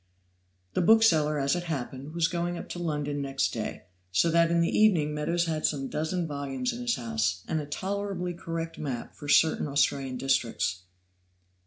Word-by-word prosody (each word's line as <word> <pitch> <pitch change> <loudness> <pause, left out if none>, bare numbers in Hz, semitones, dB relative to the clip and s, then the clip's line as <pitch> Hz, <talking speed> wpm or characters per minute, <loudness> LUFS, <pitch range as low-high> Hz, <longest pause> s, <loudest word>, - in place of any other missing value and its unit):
The - - +1
bookseller, 170 -7 +5
as 140 +3 +1
it 175 0 -3
happened, 140 -1 -5
was 170 -1 +3
going 175 0 -2
up - - -7
to 175 - -5
London 150 -3 -2
next 135 -1 -1
day, - - -4 0.3
so 130 - +3
that 170 0 +4
in 170 0 +2
the 170 - +1
evening 170 -9 +4
Meadows 170 +3 0
had 155 -2 -2
some 135 -3 0
dozen 165 +3 -1
volumes 145 - -3
in 240 - -6
his 240 -1 +1
house, 110 -5 -1
and 160 -1 -1
a 145 - -7
tolerably 190 +2 -3
correct 165 -1 -5
map 130 -6 -4
of 145 - -6
certain 160 -1 +4
Australian 140 -2 +1
districts. 115 -9 0
155 Hz, 175 wpm, -28 LUFS, 140-175 Hz, 0.3 s, bookseller